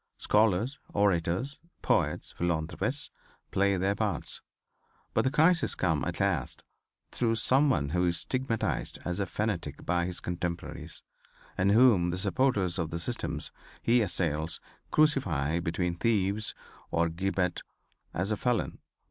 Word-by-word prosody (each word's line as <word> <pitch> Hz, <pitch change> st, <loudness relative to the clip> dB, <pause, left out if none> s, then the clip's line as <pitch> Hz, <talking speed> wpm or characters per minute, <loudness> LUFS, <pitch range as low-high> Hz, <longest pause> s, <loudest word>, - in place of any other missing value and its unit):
Scholars, 110 Hz, +5 st, +2 dB, 0.2 s
orators, 100 Hz, -, +1 dB, 0.2 s
poets, -, -, +1 dB
philanthropists, 85 Hz, -, -1 dB, 0.4 s
play 100 Hz, 0 st, +2 dB
their 95 Hz, +2 st, +1 dB
parts, -, -, -2 dB, 0.7 s
but -, -, +3 dB
the 130 Hz, -, +2 dB
crisis 160 Hz, +4 st, +3 dB
comes 80 Hz, -6 st, 0 dB
at -, -, -4 dB
last -, -, 0 dB, 0.5 s
through 115 Hz, -2 st, +1 dB
some 135 Hz, +6 st, +4 dB
one 70 Hz, -, +1 dB
who 90 Hz, +3 st, +1 dB
is 85 Hz, -, +1 dB
stigmatized 130 Hz, -4 st, -1 dB
as 90 Hz, +2 st, -2 dB
a 100 Hz, -, 0 dB
fanatic 90 Hz, -9 st, -3 dB
by 85 Hz, 0 st, +1 dB
his 90 Hz, -, -3 dB
contemporaries, 85 Hz, -1 st, -5 dB, 0.5 s
and 95 Hz, +2 st, +2 dB
whom 110 Hz, -6 st, +5 dB
the 90 Hz, -, -2 dB
supporters 100 Hz, -2 st, +1 dB
of 80 Hz, -2 st, -1 dB
the 85 Hz, -, -3 dB
systems 85 Hz, -, -2 dB, 0.3 s
he 120 Hz, +1 st, +4 dB
assails 80 Hz, -5 st, 0 dB, 0.3 s
crucify 90 Hz, -, +2 dB
between 85 Hz, 0 st, -1 dB
theives 105 Hz, +1 st, 0 dB, 0.3 s
or 85 Hz, 0 st, +2 dB
gibbet 90 Hz, +1 st, -1 dB, 0.5 s
as 95 Hz, +4 st, -1 dB
a 105 Hz, -, +1 dB
felon. 125 Hz, 0 st, -1 dB
95 Hz, 130 wpm, -29 LUFS, 85-115 Hz, 0.7 s, whom